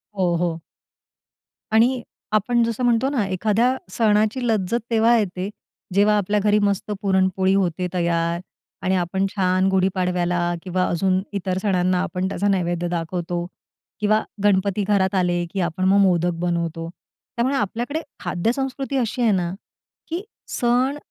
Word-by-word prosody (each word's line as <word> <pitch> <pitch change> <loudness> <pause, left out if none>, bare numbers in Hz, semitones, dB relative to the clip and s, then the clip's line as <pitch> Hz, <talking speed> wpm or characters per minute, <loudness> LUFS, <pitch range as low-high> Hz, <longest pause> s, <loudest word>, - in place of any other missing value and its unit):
हो, 180 -3 +1
हो. 170 -1 -1 1.1
आणि 240 +3 +4 0.3
आपण 235 +3 +2
जसं 230 +1 -2
म्हणतो 240 +2 +3
ना, 255 -8 0
एखाद्या 215 +6 +1 0.2
सणाची 215 +3 +2
लज्जत 220 0 +1
तेव्हा 230 +1 +4
येते, 190 -2 -2 0.4
जेव्हा 205 +2 +4
आपल्या 205 +1 +1
घरी 210 0 +4
मस्त 200 0 0
पुरणपोळी 190 -1 +2
होते 180 -2 0
तयार 170 -1 0 0.4
आणि 190 +1 +1
आपण 185 +2 0
छान 185 -1 +2
गुढीपाडव्याला 180 -2 +1
किंवा 185 0 0
अजून 185 +2 +1
इतर 190 -2 -2
सणांना 185 -2 +1
आपण 185 0 -2
त्याचा 200 +1 -1
नैवेद्य 175 -3 0
दाखवतो 175 0 -3 0.5
किंवा 215 +1 +2 0.2
गणपती 200 0 +2
घरात 195 -2 +2
आले, 175 -2 +1
की 195 - -3
आपण 175 +1 -1
मग 190 +1 +4
मोदक 175 -2 +3
बनवतो. 170 -1 -2 0.5
त्यामुळे 255 +3 +1
आपल्याकडे 240 - -2 0.2
खाद्यसंस्कृती 270 +7 -2
अशी 245 0 -1
आहे 230 -2 +4
ना, 180 -3 0 0.6
की 335 +3 -2 0.3
सण 255 +3 +1
190 Hz, 135 wpm, -22 LUFS, 180-220 Hz, 1.1 s, आणि